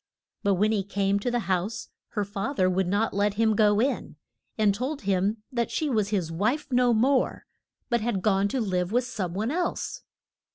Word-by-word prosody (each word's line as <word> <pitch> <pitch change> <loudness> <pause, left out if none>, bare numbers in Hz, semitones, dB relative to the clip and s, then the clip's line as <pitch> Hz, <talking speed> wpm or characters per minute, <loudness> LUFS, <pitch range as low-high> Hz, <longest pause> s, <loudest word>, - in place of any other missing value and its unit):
But 200 -1 +2
when 210 +4 +2
he 210 -3 +1
came 200 0 0
to 225 - -1
the 240 0 0
house 190 +3 -2 0.2
her 210 -2 0
fath 205 +7 -4
er 185 - +5
would 185 0 +1
not 205 +4 +1
let 205 0 +1
him 220 0 +2
go 205 -1 +4
in, 265 +5 -1 0.4
and 210 -2 +3
told 260 +8 -3
him 200 +3 0
that 235 -2 -1
she 305 -3 -1
was 215 -4 +1
his 185 -6 -1
wife 240 - -1
no 245 -1 +4
more, 255 +4 +2 0.4
but 235 -2 +1
had 215 -4 -1
gone 200 -2 +3
to 260 +6 -2
live 185 -4 -1
with 245 +2 +2
some 195 -8 -4
one 220 +6 -1
else. 350 +2 -2
210 Hz, 200 wpm, -26 LUFS, 195-240 Hz, 0.4 s, er